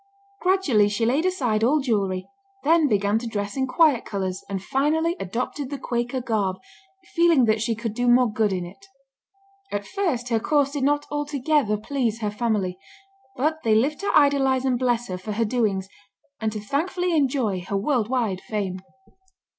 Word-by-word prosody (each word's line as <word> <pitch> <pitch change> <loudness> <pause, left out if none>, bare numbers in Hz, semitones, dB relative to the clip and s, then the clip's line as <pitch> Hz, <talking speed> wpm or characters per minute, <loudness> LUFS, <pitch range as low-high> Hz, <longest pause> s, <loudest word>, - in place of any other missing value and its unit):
Gradually 325 - +3
she 210 +3 0
laid 280 +9 +2
aside 245 -12 0
all 285 +6 +4
jewelry, 200 -8 -1 0.4
then 320 0 +4
began 205 -2 +1
to 235 - -6
dress 205 -2 -3
in 265 -1 0
quiet 290 -2 +3
colors, 190 -2 -4
and 195 -1 -2
finally 315 - +1
adopted 250 +7 -3
the 285 - -4
Quaker 245 0 -2
garb, 210 -6 -1 0.6
feeling 335 -7 +4
that 220 -1 +1
she 225 +1 0
could 225 -1 -4
do 245 +2 -1
more 245 +1 +6
good 215 -1 0
in 180 -2 -2
it. 195 +3 -13 0.8
At 205 0 -3
first 310 - -2
her 230 -2 +2
course 285 +3 +1
did 285 -2 -3
not 290 +1 +1
altogether 290 -5 0
please 230 0 -2
her 210 -1 -1
family, 210 -5 -1 0.6
but 310 +4 0
they 220 -1 +3
lived 275 +7 +1
to 400 - -2
idolize 270 -2 +3
and 250 -2 +1
bless 240 -2 0
her 185 -1 -5
for 210 +3 -5
her 230 +2 0
doings, 210 -5 0 0.5
and 220 -1 -1
to 215 - -5
thankfully 340 - -1
enjoy 255 - +1
her 195 +3 -3
worldwide 230 -3 0
fame. 195 -4 -3
240 Hz, 170 wpm, -24 LUFS, 210-285 Hz, 0.8 s, more